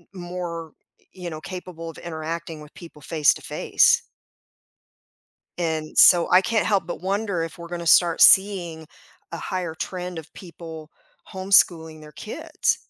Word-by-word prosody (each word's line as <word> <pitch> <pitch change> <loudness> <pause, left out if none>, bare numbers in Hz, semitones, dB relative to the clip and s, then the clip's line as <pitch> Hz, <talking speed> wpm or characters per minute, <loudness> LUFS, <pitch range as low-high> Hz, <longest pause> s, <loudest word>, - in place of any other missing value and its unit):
m 180 - -8
more, 175 -2 -6 0.3
y - - -33 0.2
you 175 - -4
know, 155 - -8
capable 180 -2 -8
of 160 - -11
interacting 165 -1 -6
with 150 - -14
people 165 -4 -13
face 150 +1 +2
to - - -12
face. - - +2 1.6
And 160 -3 -3
so 175 -1 +7
I 180 - +6
can't 220 +4 0
help 200 -5 +1
but 175 - -7
wonder 200 -2 -2
if 165 - -7
we're 170 0 -9
gonna 170 -1 -6
start 170 -1 +4
seeing 180 -5 +4 0.5
a 170 - -5
higher 180 -3 -4
trend 180 0 -5
of 160 0 -14
people 165 -3 -11 0.4
homeschooling 170 -4 +2
their 150 0 -13
kids. - - -3
170 Hz, 155 wpm, -23 LUFS, 160-180 Hz, 1.6 s, so